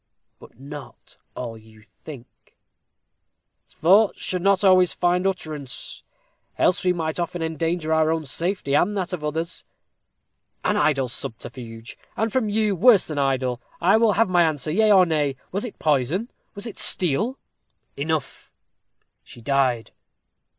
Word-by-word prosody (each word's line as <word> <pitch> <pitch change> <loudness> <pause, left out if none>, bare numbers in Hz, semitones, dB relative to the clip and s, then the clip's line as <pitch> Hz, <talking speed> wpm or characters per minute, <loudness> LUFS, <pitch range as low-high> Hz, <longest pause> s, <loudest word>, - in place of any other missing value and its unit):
"But - - -17
not 140 -1 -11 0.2
all 120 -2 -5
you 110 0 -19
think." 120 +4 -14 1.1
"Thoughts 195 +6 +3
should 180 -1 -2
not 195 +1 +2
always 185 -2 +5
find 180 +1 +1
utterance, 155 -8 -5 0.6
else 180 - +2
we 180 - +3
might 160 -2 -2
often 175 0 -3
endanger 160 0 -1
our 160 0 +3
own 160 -1 -2
safety, 165 0 -2
and 205 +8 +2
that 185 -1 -3
of 165 -4 -4
others." 160 +3 -3 1.0
"An - - +1
idle 140 -3 +2
subterfuge 115 -1 -8 0.2
and, 220 0 -1
from 250 -5 +1
you, 210 -1 +1
worse 205 +1 +5
than 150 -2 -4
idle. 130 -3 0 0.2
I 180 +4 +4
will 225 -2 +3
have 230 - +3
an - - -2
answer, 155 -4 +2
yea 215 +5 +3
or 190 -2 +7
nay. 150 -5 0 0.2
Was 200 +3 -2
it 245 - -7
poison 155 - 0 0.2
was 200 +2 -7
it 230 - -6
steel?" 190 - +1 0.6
"Enough 155 +1 -3 0.7
she - - -14
died." 130 -2 0
160 Hz, 145 wpm, -23 LUFS, 140-190 Hz, 1.1 s, or